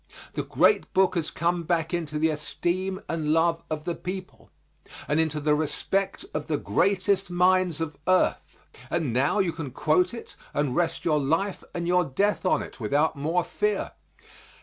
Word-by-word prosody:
The - - -1
Great 435 - +2
Book 190 -1 +4
has 170 -4 -1
come 170 +1 0
back 165 -1 -1
into 160 -3 -2
the 160 +1 +2
esteem 175 +5 -2
and 160 -2 -2
love 165 +2 +2
of 155 -1 -3
the 175 +1 -2
people, 185 +2 -7 0.6
and 150 - +1
into 155 -1 +1
the 150 0 +2
respect 155 - -1
of - - -3
the - - 0
greatest 195 -1 +1
minds 180 -2 +3
of 160 -2 -3
earth, 185 0 +1 0.3
and 160 -8 -1
now 140 - +2
you 190 -4 +2
can 160 -4 -6
quote 155 - +1
it 230 - -10 0.2
and 145 -3 0
rest 170 -1 0
your 155 -3 +3
life 165 +8 0
and 170 -1 -2
your 180 0 +4
death 190 +7 0
on - - +2
it - - -11
without 145 +8 +1
more 160 +5 0
fear. 420 - -1
170 Hz, 170 wpm, -26 LUFS, 150-185 Hz, 0.6 s, Book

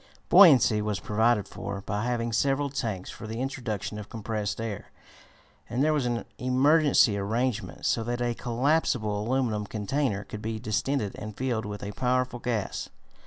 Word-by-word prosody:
Buoyancy 130 - +7
was 105 -1 -2
provided 110 -1 +1
for 100 0 -6
by 105 +2 -3
having 120 -1 -1
several 140 +4 +1
tanks 110 -9 -3
for 110 - -9
the 110 +2 -5
introduction 110 -6 -3
of 105 - -9
compressed 110 -2 -3
air, 110 -3 -5 0.8
and 120 +4 0
there 155 +1 +3
was 140 -5 +1
an 120 -1 -2
emergency 135 -2 +4
arrangement 115 +4 -2
so 115 - +1
that 120 +1 -2
a 120 -1 0
collapsible 120 -4 0
aluminum 120 -5 0
container 105 +1 -1
could 105 - -8
be 110 +1 -3
distended 110 +1 -1
and 105 -1 -7
filled 120 -4 -1
with 105 -1 -6
a 100 - -4
powerful 125 +2 0
gas. 115 -5 -2
115 Hz, 160 wpm, -27 LUFS, 105-130 Hz, 0.8 s, Buoyancy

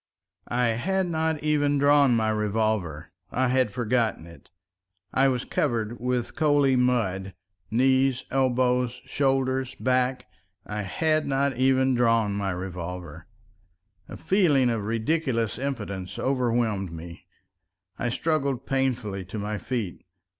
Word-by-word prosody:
I 120 0 +1
had 185 +12 0
not 160 -2 -1
even 145 -1 +2
drawn 140 -2 +5
my 110 -1 +1
revolver—I 105 - -1
had 130 -2 +2
forgotten 115 -4 -1
it. 85 0 -15 0.6
I 135 +1 +4
was 125 -2 0
covered 120 -4 -1
with 125 -1 -2
coaly 145 -4 +3
mud—knees, 115 +3 0
elbows, 125 -2 +1
shoulders, 130 -2 0
back. 125 0 0 0.4
I 105 0 -4
had 155 - 0
not 140 0 +1
even 130 +1 +3
drawn 115 -4 +2
my 100 -1 -2
revolver!... 90 -2 -6 0.8
A - - -7
feeling 150 -11 +3
of 110 -3 -2
ridiculous 115 0 -1
impotence 100 -9 -4
overwhelmed 120 -7 0
me. 85 +2 -10 0.7
I 120 - 0
struggled 140 -1 -1
painfully 125 -8 -1
to 95 +5 -7
my 105 0 -3
feet. 115 -9 -4
125 Hz, 115 wpm, -26 LUFS, 105-135 Hz, 0.8 s, drawn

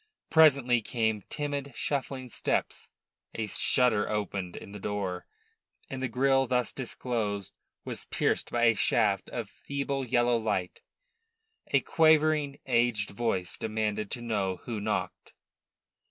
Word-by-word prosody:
Presently 140 -7 +5
came 110 -2 0
timid, 145 -2 -3
shuffling 135 -2 -2
steps; 120 - -2 0.5
a 110 - -1
shutter 110 +1 +2
opened 100 -4 -3
in - - -9
the 105 - -8
door, 95 -3 -3 0.6
and 130 -1 -4
the 130 - 0
grille 135 +2 +2
thus 125 0 0
disclosed 115 -6 -3 0.3
was - - -4
pierced - - 0
by 120 0 0
a 115 -1 +6
shaft 100 -2 +1
of 115 -3 -4
feeble 140 +4 -3
yellow 120 -1 +2
light. 105 -5 -2 0.9
A - - +3
quavering, 155 -3 +3
aged 120 -4 +1
voice 100 -5 -1
demanded 110 -2 -2
to 120 - -5
know 100 -5 -1
who 115 -4 -3
knocked. 105 +1 -3
120 Hz, 125 wpm, -29 LUFS, 105-135 Hz, 0.9 s, a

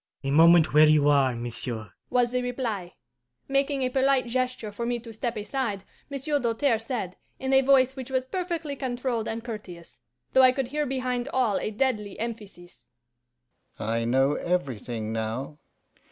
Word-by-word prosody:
'A 135 - -1
moment 165 +2 +6
where 155 +1 +7
you 150 -1 +4
are, 135 -4 +4
monsieur,' 115 -3 -5 0.2
was 245 -1 +2
the 250 0 0
reply. 235 -8 -3 0.5
Making 275 0 +1
a 255 - +1
polite 265 0 +2
gesture 250 -3 -2
for 205 +3 -5
me 240 +1 0
to 230 -1 -10
step 235 +1 -3
aside, 210 -2 -3 0.3
Monsieur 285 +1 -1
Doltaire 235 0 +1
said, 225 -6 -4 0.2
in 265 0 -2
a 265 - +7
voice 265 -1 +4
which 260 -1 -7
was 260 -1 0
perfectly 335 -1 -3
controlled 245 -3 -2
and 225 0 -4
courteous, 195 - -9 0.3
though 260 - +6
I 255 -1 +7
could 260 -2 -2
hear 300 +1 -1
behind 255 -1 -2
all 245 -6 +2
a - - -2
deadly 215 -3 -1
emphasis, 195 - -8 0.9
'I 115 +2 -1
know 135 +4 +3
everything 120 -11 -2
now. 115 +7 -4
230 Hz, 160 wpm, -26 LUFS, 165-260 Hz, 0.9 s, where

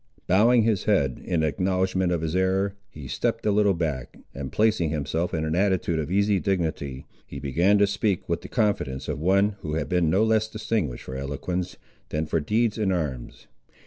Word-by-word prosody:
Bowing 115 +5 +4
his 110 -4 +1
head, 70 -12 +1
in 85 -3 0
acknowledgment 95 +3 0
of 85 -2 0
his 80 +1 -2
error, 95 +1 +1 0.2
he 75 -4 -10
stepped 115 - -2
a 105 - +3
little 100 -2 +3
back, 75 -7 -3 0.2
and 70 -1 -6
placing 105 -7 +2
himself 80 +3 -2
in 80 -1 -1
an 80 - -1
attitude 90 -3 +1
of 75 - -3
easy 100 0 +2
dignity, 80 -9 -2 0.2
he - - -8
began 85 +9 +2
to 100 - +5
speak 100 -1 -1
with 85 0 -1
the - - -9
confidence 75 - -1
of - - -3
one 100 +5 +2
who 75 -5 -4
had 75 -3 -1
been 90 -3 +2
no 95 +6 +3
less 110 -1 +2
distinguished 110 - -2
for 65 - -7
eloquence, 80 +7 -4 0.3
than 75 +1 -1
for 80 - 0
deeds 110 +7 0
in 100 -3 +1
arms. 75 -9 -4
90 Hz, 190 wpm, -25 LUFS, 75-100 Hz, 0.3 s, to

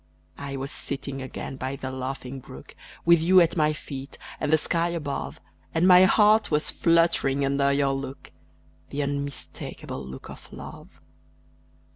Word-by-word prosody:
I 140 -1 -5
was 135 +2 -4
sitting 140 -1 -4
again 130 0 -6
by 130 +1 -3
the 130 -1 -5
laughing 130 0 -5
brook, - - -12 0.3
With 170 0 +6
you 185 +3 +6
at 170 -2 +3
my 155 -2 +3
feet, 140 -3 -7 0.2
and - - -1
the 155 - +6
sky 165 +2 0
above, 150 -5 -4 0.4
And 165 +3 +4
my 180 0 +8
heart 215 +3 +5
was 150 0 +1
fluttering 165 -5 +2
under 140 0 +2
your 140 -1 +2
look 135 0 -6 0.6
The 145 +1 -2
unmistakable 140 -1 -5
look 65 +1 -9
of - - -12
Love. - - -11
140 Hz, 150 wpm, -26 LUFS, 135-165 Hz, 0.6 s, my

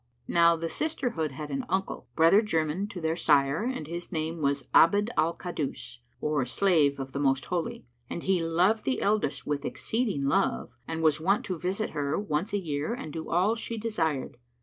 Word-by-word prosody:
Now 170 0 +5
the 165 0 -3
sisterhood 235 - -2
had 150 +2 -6
an 135 - -2
uncle, 190 +2 -2
brother 165 +6 +6
german 165 -1 -1
to 205 -4 -7
their 160 -1 0
sire 140 -2 +3
and 250 -10 -3
his 170 +3 -6
name 160 -1 -3
was 140 -1 0
Abd 205 +7 +5
al 165 +2 +1
Kaddús, 145 -8 -5 0.2
or 150 -3 0
Slave 145 0 +2
of 135 0 -5
the 140 - -4
Most 135 -1 +1
Holy; 175 -6 -3 0.2
and 170 - -5
he 190 -2 +2
loved 180 +7 +2
the 260 - 0
eldest 205 -8 0
with 145 -1 -2
exceeding 215 - -1
love 70 - +1 0.2
and 160 0 -3
was 155 0 +3
wont 195 +5 +2
to 185 -3 -3
visit 190 +5 -2
her 145 0 -1
once 195 -2 -2
a 205 - +1
year 155 +2 -2
and 155 - -7
do 160 -1 -5
all 185 +6 +3
she 230 0 -4
desired. 165 - -2
165 Hz, 190 wpm, -28 LUFS, 150-195 Hz, 0.2 s, brother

